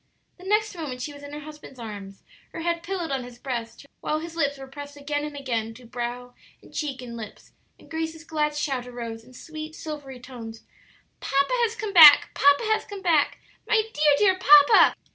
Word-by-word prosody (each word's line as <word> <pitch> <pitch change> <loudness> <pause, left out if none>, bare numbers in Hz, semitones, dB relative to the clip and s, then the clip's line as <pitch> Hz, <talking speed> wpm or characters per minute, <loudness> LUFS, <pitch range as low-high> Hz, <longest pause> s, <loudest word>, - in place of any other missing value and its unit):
The 365 - -13
next 425 0 +1
moment 265 -7 -5
she 295 - -5
was 285 - -12
in 285 0 -10
her 295 +1 -7
husband's 300 -3 -12
arms, 205 -4 -9 0.3
her - - -6
head 340 0 -1
pillowed 345 -2 -4
on 265 -2 -2
his 245 -1 -11
breast, 245 -1 -6
while 305 - -1
his 330 +1 -7
lips 285 -4 0
were 270 - -9
pressed 285 +2 -10
again 290 +1 -3
and 300 -1 -6
again 230 -5 -3
to 250 +1 -14
brow 245 +1 -5 0.3
and - - -19
cheek 275 -5 -4
and 235 -1 -8
lips, 220 -3 -10 0.3
and - - -19
Grace's 320 0 -5
glad 300 -2 -1
shout 270 -4 -2
arose, 230 -2 -7
in 255 +2 -18
sweet, 310 +2 -8
silvery 290 -5 -8
tones, 235 -3 -10 0.6
"Papa 275 - 0
has 450 - -8
come 430 -3 -5
back! 310 -5 +9
Papa 285 +5 +4
has 435 -1 +1
come 400 -2 -9
back! 320 -5 +2 0.3
My 435 - +3
dear, 295 -1 +4
dear 380 0 +3
papa!" 295 -4 +7
285 Hz, 200 wpm, -25 LUFS, 250-320 Hz, 0.6 s, back